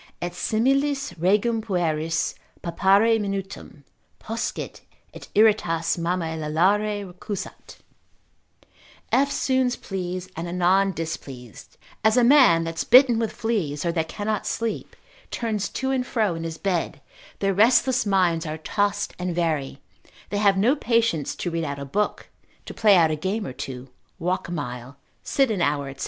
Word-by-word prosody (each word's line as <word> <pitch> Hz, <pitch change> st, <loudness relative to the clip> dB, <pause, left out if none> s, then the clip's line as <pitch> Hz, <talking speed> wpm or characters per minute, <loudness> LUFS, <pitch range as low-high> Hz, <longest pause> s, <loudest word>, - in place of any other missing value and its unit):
Et 175 Hz, -, -3 dB
similis 275 Hz, +8 st, 0 dB
regum 210 Hz, +6 st, +2 dB
pueris, 165 Hz, -6 st, -1 dB, 0.3 s
pappare 200 Hz, +6 st, +3 dB
minutum 195 Hz, -7 st, -5 dB, 0.3 s
Poscit, 225 Hz, +1 st, -5 dB, 0.3 s
et -, -, -11 dB
iratus 200 Hz, -6 st, +3 dB
mammae 170 Hz, -1 st, -1 dB
lallare 200 Hz, +7 st, +1 dB
recusat, 200 Hz, +2 st, -7 dB, 1.4 s
eftsoons 260 Hz, -2 st, +1 dB
pleased, 185 Hz, -1 st, -5 dB
and 165 Hz, +2 st, -4 dB
anon 180 Hz, +3 st, +2 dB
displeased, 140 Hz, -, -8 dB, 0.3 s
as 220 Hz, +3 st, +4 dB
a 245 Hz, -, +5 dB
man 240 Hz, -, +6 dB
that's 165 Hz, 0 st, -3 dB
bitten 250 Hz, -2 st, +6 dB
with 225 Hz, -1 st, -1 dB
fleas, 200 Hz, -11 st, -2 dB
or 170 Hz, -, +1 dB
that 165 Hz, -1 st, -1 dB
cannot 210 Hz, +3 st, -3 dB
sleep 230 Hz, -1 st, -3 dB, 0.3 s
turns 215 Hz, -4 st, -2 dB
to 265 Hz, 0 st, -2 dB
and 255 Hz, -1 st, -1 dB
fro 215 Hz, -6 st, 0 dB
in 165 Hz, 0 st, -5 dB
his 165 Hz, -1 st, -5 dB
bed, 180 Hz, -3 st, -2 dB, 0.4 s
their 195 Hz, -1 st, 0 dB
restless 245 Hz, +5 st, +4 dB
minds 185 Hz, -5 st, +2 dB
are 155 Hz, -1 st, -4 dB
tossed 205 Hz, +6 st, -1 dB
and 180 Hz, -1 st, -2 dB
vary, 155 Hz, -6 st, -1 dB, 0.5 s
they 205 Hz, -, -1 dB
have 200 Hz, -2 st, +4 dB
no 235 Hz, +9 st, +3 dB
patience 230 Hz, -, 0 dB
to 175 Hz, -, -4 dB
read 165 Hz, 0 st, -2 dB
out 140 Hz, -2 st, -4 dB
a 140 Hz, -, -6 dB
book, 205 Hz, +10 st, -2 dB, 0.4 s
to -, -, -8 dB
play 210 Hz, -3 st, +5 dB
out 165 Hz, -3 st, +4 dB
a -, -, 0 dB
game 195 Hz, +7 st, -2 dB
or 130 Hz, -, -6 dB
two, 130 Hz, 0 st, -7 dB, 0.3 s
walk 180 Hz, +1 st, -2 dB
a -, -, -7 dB
mile, 125 Hz, -4 st, -6 dB, 0.2 s
sit 270 Hz, -4 st, +1 dB
an 200 Hz, -5 st, -1 dB
hour, 145 Hz, -3 st, 0 dB
&c. 135 Hz, -, -22 dB
190 Hz, 150 wpm, -24 LUFS, 165-220 Hz, 1.4 s, man